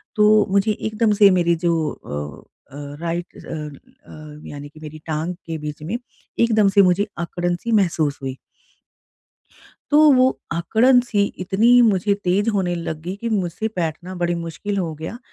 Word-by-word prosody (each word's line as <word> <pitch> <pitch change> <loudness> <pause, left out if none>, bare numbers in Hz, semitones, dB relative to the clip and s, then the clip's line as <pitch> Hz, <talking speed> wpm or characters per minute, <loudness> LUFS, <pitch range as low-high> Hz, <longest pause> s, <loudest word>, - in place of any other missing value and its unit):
तो 210 0 +5
मुझे 200 +2 +2
एकदम 215 +1 0
से 200 - +9
मेरी 170 -2 +2
जो 170 -1 +2
अ 75 0 -7 0.3
अ, - - -9 0.2
राइट 170 +1 -4
अ - - -11
अ, 150 0 -10
यानी 145 0 -8
कि 155 - -17
मेरी 155 0 -9
टाँग 160 +3 -2
के 165 -1 -4
बीच 150 -1 -7
में 190 +10 -3 0.4
एकदम 220 -3 +4
से 200 - +6
मुझे 185 +2 +3
अकड़न-सी 175 +5 -3
महसूस 165 -9 +1
हुई। 135 -1 -5 1.5
तो 295 +1 +6
वो 255 0 +5 0.2
अकड़न-सी 225 +6 +3 0.2
इतनी 230 +7 +4
मुझे 205 -2 +2
तेज 195 +5 +1
होने 180 -3 0
लग 165 -2 -5
गई 180 +3 -4
कि 235 - -2
मुझसे 190 0 -1
बैठना 175 +2 -3
बड़ी 175 0 +1
मुश्किल 200 +5 -4
हो 165 -4 -2
गया 160 +10 -7
175 Hz, 155 wpm, -21 LUFS, 160-210 Hz, 1.5 s, से